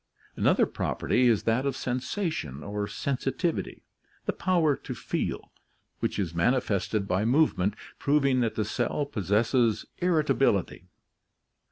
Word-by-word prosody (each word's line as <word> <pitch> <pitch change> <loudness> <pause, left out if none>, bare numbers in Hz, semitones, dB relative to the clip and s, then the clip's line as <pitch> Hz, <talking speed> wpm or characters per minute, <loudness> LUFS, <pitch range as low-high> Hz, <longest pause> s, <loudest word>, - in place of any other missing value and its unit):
Another - - +3
property 125 0 0
is 115 -4 +3
that 115 +3 +1
of 140 -2 -1
sensation 130 - -3
or 100 0 -3
sensitivity, 140 - -2 0.4
the - - 0
power 170 -6 +2
to - - -7
feel, - - -3 0.5
which - - -1
is 90 -5 -2
manifested 100 +1 +1
by 95 +2 +1
movement, 115 - +2 0.2
proving 140 -2 +2
that 115 -3 0
the 110 - 0
cell 145 +6 -1
possesses 110 - +1
irritability. 145 - +1
120 Hz, 120 wpm, -27 LUFS, 100-140 Hz, 0.5 s, Another